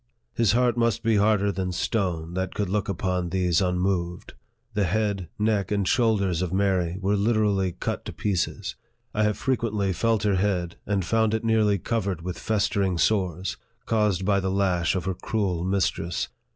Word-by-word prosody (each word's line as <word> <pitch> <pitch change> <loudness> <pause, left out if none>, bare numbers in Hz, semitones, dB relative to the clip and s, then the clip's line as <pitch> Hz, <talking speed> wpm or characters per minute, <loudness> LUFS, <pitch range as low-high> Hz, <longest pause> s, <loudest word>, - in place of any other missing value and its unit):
His 115 -2 +2
heart 120 0 +2
must 115 -1 +1
be 115 -1 +3
harder 100 -1 +3
than 95 -1 -2
stone, 90 -4 -1
that 95 0 -3
could 100 -3 -1
look 100 0 -1
upon 90 -1 -1
these 90 -1 +1
unmoved. 90 -1 -1 0.4
The 105 -2 +1
head, 100 -3 -1
neck, 105 -3 +1
and 100 -2 0
shoulders 100 -8 +2
of 90 -2 -2
Mary 95 -3 +1
were 100 +1 +1
literally 100 -3 +1
cut - - -3
to - - -5
pieces. 100 -5 -2 0.4
I 105 - 0
have 105 -1 +2
frequently 110 -7 0
felt 110 +3 +1
her 100 -3 +2
head, 90 -3 -1
and 100 -3 0
found 110 +2 +2
it 110 - -3
nearly 110 -2 +3
covered 100 -4 -2
with 90 -2 -5
festering 100 -4 0
sores, 95 -2 0 0.3
caused 105 -5 +1
by 100 0 +3
the 95 0 -1
lash 95 -3 +1
of 90 - -2
her 95 - 0
cruel 90 -3 -2
mistress. 90 -2 -1
100 Hz, 170 wpm, -25 LUFS, 90-105 Hz, 0.4 s, be